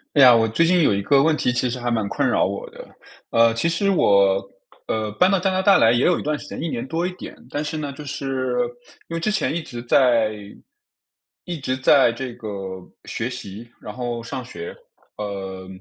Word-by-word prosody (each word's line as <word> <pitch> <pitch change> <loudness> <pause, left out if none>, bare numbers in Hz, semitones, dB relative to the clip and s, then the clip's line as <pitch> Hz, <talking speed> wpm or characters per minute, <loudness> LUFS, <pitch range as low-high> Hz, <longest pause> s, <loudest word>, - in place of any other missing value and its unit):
哎 140 - +6
呀， 125 -2 +9
我 115 -1 +3
最 140 +10 +2
近 180 +1 +3
有 145 - +4
一 100 - 0
个 135 +6 +4
问 160 0 +3
题， 125 - 0
其 125 +1 0
实 125 - -3
还 120 -1 -2
蛮 110 -3 0
困 - - -1
扰 - - +2
我 - - -4
的。 - - -12 0.4
呃， 115 0 +4
其 115 +9 0
实 170 +4 +1
我， 100 - +4 0.5
呃， 110 -1 -2
搬 180 - +5
到 195 - +3
加 190 +1 0
拿 185 0 +1
大 195 +1 +5
来 115 - +5
也 120 +1 +2
有 180 - +3
一 - - -5
段 150 -1 -1
时 - - -11
间， - - -7
1 165 - -2
年 120 -3 -4
多 165 +4 -1
一 185 - -2
点。 - - -9
但 145 - -3
是 155 +1 -4
呢， 150 -2 -4
就 145 +2 -10
是 135 -3 -3 0.5
因 165 - -4
为 165 - -1
之 215 - -1
前 210 -6 0
一 170 - -2
直 120 -5 -8
在 120 -3 +3 1.1
一 175 -3 -5
直 130 -1 -2
在 130 -2 +4
这 130 0 -6
个 110 - -7 0.5
学 120 - -4
习， 115 -2 -8
然 105 - -8
后 120 -1 -4
上 125 +2 -5
学， 440 +3 -8 0.4
呃， 95 -2 -6
130 Hz, 240 characters per minute, -22 LUFS, 115-165 Hz, 1.1 s, 呀